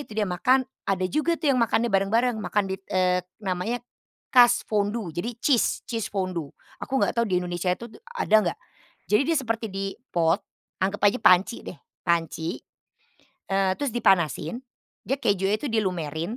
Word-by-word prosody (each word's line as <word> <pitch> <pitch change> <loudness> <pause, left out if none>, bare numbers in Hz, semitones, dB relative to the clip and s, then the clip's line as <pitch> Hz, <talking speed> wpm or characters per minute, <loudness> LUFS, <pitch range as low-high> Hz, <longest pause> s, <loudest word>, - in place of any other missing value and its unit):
itu - - -13
dia 210 - +1
makan 255 +9 +3 0.3
ada 185 -2 +1
juga 310 +3 +1
tuh 295 - +1
yang 255 - +1
makannya 230 +1 +2
bareng-bareng 225 +5 +2
makan 205 -1 0
di, 190 - -1
eee, 180 -1 +2 0.2
namanya 200 +6 -2 0.5
Kaasfondue, 220 -6 +3
jadi 200 +9 -2
cheese, 260 -6 +2
cheese 225 -3 -3
fondue 185 -6 -3 0.3
aku 265 0 -1
nggak - - +1
tahu 235 - +3
di 185 -4 +1
Indonesia 175 0 -2
itu 235 +6 -5
d - - -15
ada 480 - +1
nggak. - - -10 0.5
Jadi 210 +6 +3
dia 325 - +2
seperti 230 -3 -2
di 195 0 -4 0.2
pot, 170 +2 +2 0.4
anggap 195 +2 0
aja 215 +5 +3
panci 185 +6 +4
deh, - - -9 0.2
panci, 165 -1 -1 0.9
eee, 195 -1 +2
terus 285 -2 -2
dipanasin 185 - +1 0.4
dia 270 +2 -2
kejunya 200 -2 +1
itu 290 - -5
dilumerin. 180 -1 -2
200 Hz, 160 wpm, -25 LUFS, 180-235 Hz, 0.9 s, panci